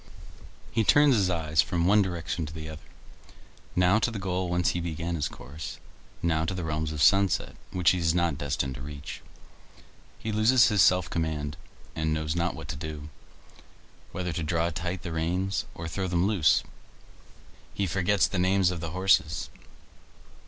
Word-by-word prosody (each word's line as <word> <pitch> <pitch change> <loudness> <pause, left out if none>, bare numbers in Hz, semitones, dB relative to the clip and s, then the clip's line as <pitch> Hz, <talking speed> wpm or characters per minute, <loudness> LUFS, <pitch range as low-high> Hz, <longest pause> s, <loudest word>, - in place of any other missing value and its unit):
He 115 - +1
turns 145 +5 +5
his 100 -4 +2
eyes 80 -3 +2
from 85 0 -1
one 105 +3 +5
direction 85 -4 -3
to 80 - -9
the 80 -1 -6
other; 80 -1 -9 0.9
now 90 +4 +4
to 115 - +1
the 115 - -5
goal 95 -2 -2
whence 90 -1 +1
he 90 - -1
began 85 0 -3
his 75 -4 -1
course, 75 +4 -8 0.5
now 80 -2 +1
to 90 +3 -2
the 90 - -4
realms 80 0 -2
of 75 -1 -1
sunset 95 +2 +3
which 90 +1 +3
he 90 - 0
is 80 0 +1
not 85 -4 +1
destined 70 -2 -2
to 65 - -9
reach. 70 0 -8 1.0
He 110 - -4
loses 110 +3 +5
his 105 -3 +3
self 90 -1 +4
command, 75 -3 -2 0.4
and 80 -1 0
knows 80 0 -2
not 85 +1 0
what 80 -3 -8
to - - -3
do, 75 0 -7 1.0
whether 90 -2 -3
to 85 - -3
draw 85 +1 0
tight 85 +3 -4
the 85 - -5
reins 90 +4 -1
or 80 - -6
throw 95 +3 -3
them 85 0 +1
loose; 100 -7 +3 1.1
he 100 - 0
forgets 95 +2 +2
the 95 - -2
names 95 0 +3
of 90 - -4
the 85 - -4
horses. 90 -2 +1
85 Hz, 175 wpm, -27 LUFS, 80-95 Hz, 1.1 s, turns